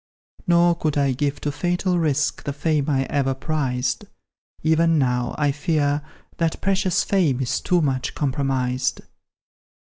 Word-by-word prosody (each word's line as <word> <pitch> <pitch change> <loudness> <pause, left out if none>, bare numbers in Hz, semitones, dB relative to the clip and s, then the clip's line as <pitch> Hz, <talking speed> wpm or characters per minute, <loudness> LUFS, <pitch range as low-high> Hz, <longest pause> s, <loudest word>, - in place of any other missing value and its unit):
"Nor 175 0 +5
could 155 -3 -2
I 140 -1 +2
give 140 +2 -1
to 145 - -1
fatal 175 +3 0
risk 150 -3 0
The 140 - -2
fame 150 0 0
I 135 -2 +2
ever 135 -1 0
prized; 135 -4 -2 0.6
Even 160 +1 +3
now, 125 -3 0
I 145 -2 +2
fear, 145 0 0 0.4
that 165 -1 0
precious 190 0 +1
fame 165 -10 +1
Is 130 -2 -1
too 180 -1 +2
much 130 -3 -1
compromised." 130 -2 -1
145 Hz, 140 wpm, -22 LUFS, 135-165 Hz, 0.6 s, Nor